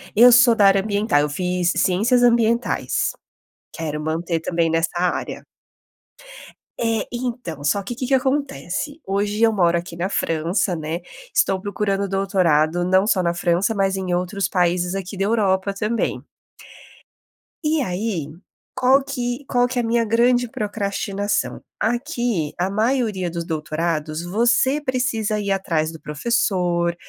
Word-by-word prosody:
Eu 240 +4 +8
sou 245 -1 +7
da 210 -3 +4
área 195 0 +5
ambiental, 205 -6 +1
eu 150 - 0
fiz 180 +2 0
Ciências 225 +7 +2
Ambientais. 235 0 +2 0.6
Quero 150 -2 -4
manter 165 +2 -2
também 165 0 0
nessa 165 +2 0
área. 180 0 -2 1.4
É, 225 -1 0
então, 240 - -5
só 185 +8 +1
que 220 - -5
o - - -14
que 255 - -3
que 270 - 0
acontece? 270 - -1
Hoje 205 +2 -1
eu 230 -1 +5
moro 175 -5 +2
aqui 170 0 -6
na 175 +2 -1
França, 175 +1 0
né. 160 +1 -4 0.3
Estou 190 - +2
procurando 200 0 -2
doutorado 175 -4 +1
não 190 +2 +3
só 195 -4 +3
na 170 0 +1
França 175 +4 +1
mas 195 -1 +1
em 185 -2 -2
outros 180 +3 -1
países 180 0 0
aqui 195 0 -5
da 195 - 0
Europa 200 -3 +1
também. 215 +3 -2 1.4
E 305 0 +1
aí, 185 - -3 0.4
qual 265 +2 +3
que 250 -1 -3
qual 245 -1 +2
que 250 +1 -5
é - - +3
a - - -3
minha 230 0 +1
grande 245 +2 +2
procrastinação? 205 -1 -2 0.2
Aqui 240 - -1
a 180 +2 0
maioria 215 -3 0
dos 170 0 -4
doutorados 155 0 -2
você 240 +8 +2
precisa 250 -6 -1
ir 200 -1 -2
atrás 165 -5 0
do 160 - -11
professor, 175 0 0
195 Hz, 145 wpm, -21 LUFS, 175-235 Hz, 1.4 s, Eu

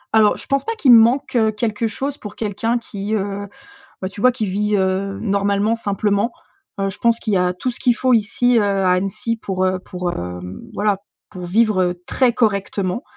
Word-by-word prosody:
Alors, 215 -1 +5
je - - -9
pense 275 0 0
pas 455 - -3
qu'il 280 - +4
manque, 235 +5 +4
heu, 220 -2 +3
quelque 215 +1 -1
chose 275 +5 -4
pour 210 -1 -9
quelqu'un 225 +2 -1
qui, 210 -2 -4
heu, 200 0 -3 0.5
bah, 185 - -3
tu 200 - -9
vois? 255 - +6
Qui 225 -4 -3
vit, 210 +2 0
heu, 195 +1 0
normalement 200 +1 +1
simplement. 205 0 0 0.5
Heu, 195 0 0
je 195 - -8
pense 235 0 +2
qu'il 215 - -2
y - - +4
a 180 0 +1
tout 180 +8 -3
ce 240 - -6
qu'il 245 -2 +3
faut 255 +1 +1
ici, 240 +2 +3
heu, 220 - +3
à 195 -2 +1
Annecy 195 +5 -1
pour, 190 -3 -2
heu, 185 0 +1
pour, 180 -1 -4
hem, 90 - -6
voilà, 205 -1 +1 0.3
pour 185 -3 -9
vivre 185 -2 +2
très 255 -3 +2
correctement. 200 -1 0
205 Hz, 200 wpm, -20 LUFS, 195-230 Hz, 0.5 s, vois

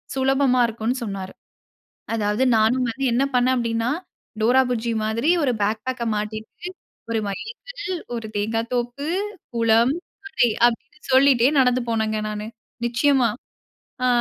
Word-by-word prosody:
சுலபமா 265 -1 +3
இருக்கும்ன்னு 230 +3 -2
சொன்னாரு. 195 -3 -5 0.8
அதாவது 210 +3 +1
நானும் 245 +4 +3
வந்து 270 +4 -4
என்ன 260 +3 +2
பண்ணேன் 255 +1 +3
அப்டீன்னா, 230 0 0 0.5
டோரா 255 +4 +5
புஜ்ஜி 235 -1 -1
மாதிரி 230 +9 +1
1 255 -3 +2
பேக் 215 +2 0
பேக்க 245 -2 -2
மாட்டிட்டு, 215 +10 -5 0.4
"1 225 - +1
மைல் 205 - -5 0.2
கல், 410 -7 -4 0.2
1 225 -1 -5
தேங்கா 220 +2 0
தோப்பு, 245 +4 -2 0.5
குளம், 230 +3 +4 0.3
கடை" 310 -11 +2 0.2
அப்படீன்னு 235 -1 -3
சொல்லிட்டே 260 -2 +5
நடந்து 250 0 +3
போனேங்க 220 -1 0
நானு, 210 0 -5 0.4
நிச்சயமா. 250 +1 +3 0.8
அ - - +4
235 Hz, 130 wpm, -23 LUFS, 220-260 Hz, 0.8 s, டோரா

